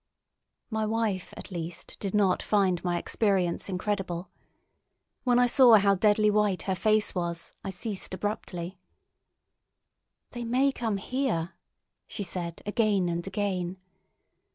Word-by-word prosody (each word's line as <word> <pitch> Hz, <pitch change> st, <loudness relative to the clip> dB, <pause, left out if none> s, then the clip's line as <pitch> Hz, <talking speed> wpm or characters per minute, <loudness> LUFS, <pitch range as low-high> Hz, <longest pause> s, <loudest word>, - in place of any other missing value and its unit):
My 220 Hz, 0 st, 0 dB
wife 215 Hz, -4 st, -1 dB
at -, -, -9 dB
least 170 Hz, -1 st, -6 dB
did 200 Hz, 0 st, -2 dB
not 195 Hz, -3 st, +3 dB
find 190 Hz, -4 st, +1 dB
my 175 Hz, -1 st, 0 dB
experience 190 Hz, -3 st, 0 dB
incredible. 185 Hz, -2 st, -3 dB, 0.9 s
When 245 Hz, -1 st, +4 dB
I 245 Hz, -, +6 dB
saw 245 Hz, -1 st, +7 dB
how 200 Hz, -1 st, +5 dB
deadly 210 Hz, +2 st, +3 dB
white 210 Hz, -3 st, +1 dB
her 190 Hz, -, 0 dB
face 215 Hz, +3 st, +2 dB
was, 170 Hz, -2 st, -3 dB
I 195 Hz, -, -4 dB
ceased 190 Hz, 0 st, -4 dB
abruptly. 185 Hz, -2 st, -4 dB, 1.5 s
"They 240 Hz, -, -5 dB
may 255 Hz, +4 st, +2 dB
come 225 Hz, -6 st, -2 dB
here," 195 Hz, -7 st, -1 dB, 0.5 s
she 205 Hz, -, -4 dB
said 175 Hz, -2 st, -4 dB
again 205 Hz, -4 st, +2 dB
and 170 Hz, +2 st, -3 dB
again. 190 Hz, -2 st, -2 dB
200 Hz, 130 wpm, -28 LUFS, 180-215 Hz, 1.5 s, saw